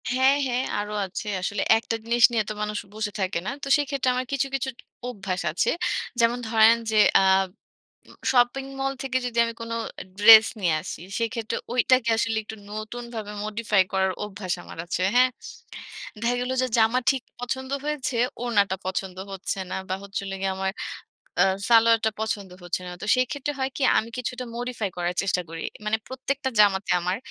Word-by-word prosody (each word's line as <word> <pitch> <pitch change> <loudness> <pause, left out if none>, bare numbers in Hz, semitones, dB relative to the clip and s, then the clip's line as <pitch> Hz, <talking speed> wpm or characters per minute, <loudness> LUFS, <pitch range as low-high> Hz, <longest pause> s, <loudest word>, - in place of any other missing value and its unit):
হ্যাঁ, 260 +3 +4
হ্যাঁ, 250 +1 0 0.2
আরো 210 0 -4
আছে। 190 +3 -6
আসলে 200 +2 -2 0.2
একটা 225 0 -3
জিনিস 235 0 +2
নিয়ে 225 -2 +1
তো - - -2
মানুষ 210 0 -2 0.2
বসে 215 -1 -3
থাকে 190 -2 0
না। - - -1
তো - - -3
সেইক্ষেত্রে 280 -3 0
আমার 255 +1 -1
কিছু, 275 0 +1
কিছু 265 0 -1 0.4
অভ্যাস 195 -6 -4
আছে। 165 - +1 0.5
যেমন 235 +1 +3
ধরেন 225 0 +6 0.2
যে, 215 - +1 0.2
আব 190 0 +4 0.6
উ - - -14 0.2
শপিং 245 +1 +3 0.2
মল 270 0 0
থেকে 260 -1 0
যদি 235 -1 -4
আমি 230 0 -4
কোন 230 0 -5 0.5
ড্রেস 220 +1 +10
নিয়ে 175 -4 +2
আসি, 170 - -6 0.2
সেক্ষেত্রে 230 -1 -2 0.2
ঐটাকে 250 -1 +3
আসলে 225 0 0
একটু 220 +1 -8
নতুনভাবে 220 0 -6
মডিফাই 215 -2 +2
করার 190 0 +2
অভ্যাস 190 -3 -5
আমার - - -11
আছে। 175 - -2
হ্যাঁ? 255 +1 +5 0.9
দেখা 235 +2 +1
গেল 250 +1 -2
যে, - - +2
জামা 225 +3 +4
ঠিক 265 -2 -1 0.2
পছন্দ 260 +2 -4
হয়েছে, 295 -4 -2 0.3
ওড়নাটা 205 -5 +2
পছন্দ 185 0 -3 0.2
হচ্ছে 195 0 -3
না, - - -2
বা 185 - 0
হচ্ছিল 195 0 -5
গিয়ে 195 0 0
আমার 190 0 -1 0.7
আ - - +8 0.3
সালোয়ারটা 230 -1 +5
পছন্দ 205 -3 -2
হচ্ছে 175 +1 -2
না। - - -6
তো - - -4
সেইক্ষেত্রে 280 +3 -1
হয় 265 0 0
কি, - - -5 0.2
আমি 225 - 0
কিছুটা 250 0 -4
মডিফাই 240 -4 -3
করার 175 0 -1
চেষ্টা 185 -2 0
করি। 165 0 -6 0.2
মানে 215 +1 +1
প্রত্যেকটা 265 +1 -2
জামাতে 200 -1 +4
আমার 180 +2 -1
225 Hz, 175 wpm, -25 LUFS, 195-250 Hz, 0.9 s, ড্রেস